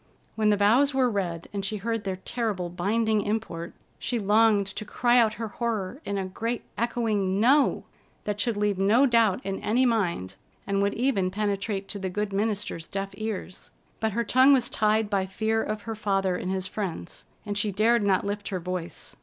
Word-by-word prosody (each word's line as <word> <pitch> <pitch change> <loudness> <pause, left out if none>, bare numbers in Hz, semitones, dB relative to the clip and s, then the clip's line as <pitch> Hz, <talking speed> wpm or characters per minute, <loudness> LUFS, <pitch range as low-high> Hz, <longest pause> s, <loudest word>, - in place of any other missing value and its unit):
When 215 -1 +2
the 205 - +3
vows 250 +8 +4
were 255 -2 +3
read, 175 -5 -3
and 200 -1 -3
she 210 +2 -2
heard 225 +1 -3
their 190 -1 -1
terrible 190 -2 -3
binding 215 +5 +1
import, 200 -5 -3 0.2
she 245 - -2
longed 210 0 +4
to 195 +2 -6
cry 240 +3 +3
out 220 -2 +3
her 225 0 -4
horror 230 +2 -3
in 200 - -2
a 195 - -1
great, 230 +6 -3
echoing, 215 -5 0
"No!" 270 +6 +4 0.4
that 210 0 -2
should 230 -2 0
leave 205 -2 0
no 215 +8 +5
doubt 230 -6 +3
in 195 0 -2
any 245 +5 +2
mind, 170 - 0 0.3
and 200 0 0
would 200 0 +1
even 230 -7 +1
penetrate 200 0 -2
to 205 - -4
the 190 -1 -3
good 210 +2 -2
minister's 205 -5 -2
deaf 195 0 -3
ears. 215 -4 -6 0.3
But 220 -2 0
her 235 +2 0
tongue 260 +5 +5
was 260 -3 +2
tied 215 0 +2
by 195 -2 0
fear 220 +3 0
of 215 -1 -4
her 225 - -4
father 195 -4 0
and 180 - -4
his 190 -1 -1
friends, 190 -4 -5 0.2
and 205 -1 -3
she 205 0 0
dared 225 +4 +3
not 195 -2 +2
lift 205 0 -3
her 185 - -2
voice. 180 -1 -5
205 Hz, 195 wpm, -26 LUFS, 195-225 Hz, 0.4 s, no